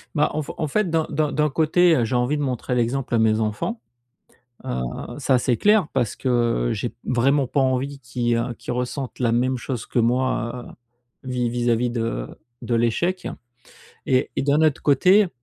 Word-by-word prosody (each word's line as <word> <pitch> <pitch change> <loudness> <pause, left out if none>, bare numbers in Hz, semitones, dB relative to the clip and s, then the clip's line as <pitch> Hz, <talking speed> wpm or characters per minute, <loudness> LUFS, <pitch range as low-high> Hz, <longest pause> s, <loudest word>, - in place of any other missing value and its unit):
Bah, 150 -1 +3
en 155 0 -1
f - - -7
en 155 - -1
fait, 195 +6 0
d'un 160 -1 +1
d'un 150 0 0
d'un 150 0 +1
côté, 165 +4 +3
heu, 120 - +1
j'ai 110 - -4
envie 125 +5 +1
de 145 - -1
montrer 125 -1 -2
l'exemple 120 +1 0
à - - +3
mes 110 -1 +3
enfants, 110 - -2 0.8
heu, 60 - -2 0.4
ça, 135 -2 +3
c'est 125 0 +1
clair, 205 - +3
parce 120 -5 0
que 120 - +1
j'ai - - -4
vraiment 135 +3 +2
pas 140 - -1
envie 135 +1 0
qu'ils, 120 -1 -1
heu, 120 +1 -2
qu'ils - - -5
ressentent 125 +2 -4
la 120 -2 +1
même 125 +2 +1
chose 125 -1 -5
que 120 - -1
moi, 120 0 0 0.6
heu, - - -6
vis 125 -2 0
vis-à-vis 120 0 0
de 115 - -2 0.4
de 120 - -2
l'échec 120 +11 0 0.8
et 130 -1 +1
et - - 0
d'un 145 +2 +3
autre 155 -3 +2
côté 185 +8 +4
130 Hz, 185 wpm, -23 LUFS, 120-145 Hz, 0.8 s, côté